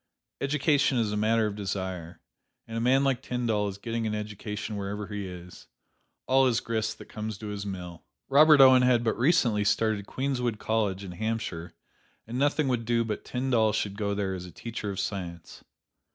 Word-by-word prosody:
Education 145 -1 +2
is 110 -3 +1
a - - -1
matter 110 +1 +2
of 105 -1 -2
desire, 95 -4 -4 0.5
and 115 - -7
a 115 - -1
man 130 +3 +4
like 135 -2 +1
Tyndall 115 -5 -1
is 100 -1 -5
getting 115 +1 -3
an 105 - -1
education 105 0 -5
wherever 100 +1 -4
he 100 -1 -5
is. 90 -1 -11 0.6
All 135 0 +4
is 120 -2 +2
grist 110 -2 -2
that - - -11
comes 110 -1 -5
to 105 0 -7
his 100 0 -5
mill. 90 -3 -7 0.2
Robert 150 +1 +7
Owen 130 -1 +8
had 125 -2 +3
but 110 - +1
recently 120 -7 +3
started 105 -1 +1
"Queenswood 125 -4 -1
College" 105 -3 -1
in 95 - -7
Hampshire, 110 -4 -4 0.5
and 120 +3 -4
nothing 145 +1 +2
would 125 -3 0
do 115 0 +1
but 105 -2 -4
Tyndall 125 -4 +1
should 100 -1 -1
go 100 -1 -1
there 100 -2 -1
as 90 -1 -6
a 90 - -10
teacher 115 +2 -6
of 100 -1 -4
science. 90 -4 -5
110 Hz, 185 wpm, -28 LUFS, 100-125 Hz, 0.6 s, Owen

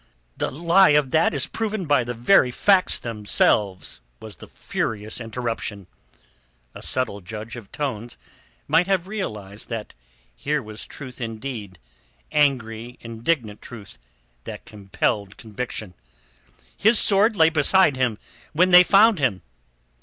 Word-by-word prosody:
"The - - -2
lie 170 +1 +4
of 140 -3 0
that 160 +3 +3
is 140 -3 -1
proven 215 -4 -3
by 145 -4 +2
the 120 +1 -5
very 125 +3 +4
facts 190 +8 +2
themselves," 105 - 0 0.2
was 105 -6 -11
the - - -12
furious 110 +1 -4
interruption. 115 -3 -5 0.9
A - - -11
subtle 115 -6 0
judge 110 +4 -8
of 115 -5 -11
tones 120 -5 -5 0.5
might 175 +2 +3
have 190 -2 0
realized 105 - -6
that 115 -3 -6 0.4
here 150 - -1
was 110 0 -8
truth 130 -2 -10
indeed, 115 -4 -6 0.5
angry 120 -5 0
indignant 115 -1 -3
truth 105 - -11 0.5
that - - -8
compelled 100 0 -3
conviction. 110 -3 -7 0.8
"His 220 +2 +4
sword 210 +3 +4
lay 160 -3 +5
beside 160 +1 +4
him 125 -4 -1 0.4
when 180 +4 +3
they 180 0 +10
found 200 +2 +5
him." 105 - 0
125 Hz, 130 wpm, -23 LUFS, 110-165 Hz, 0.9 s, they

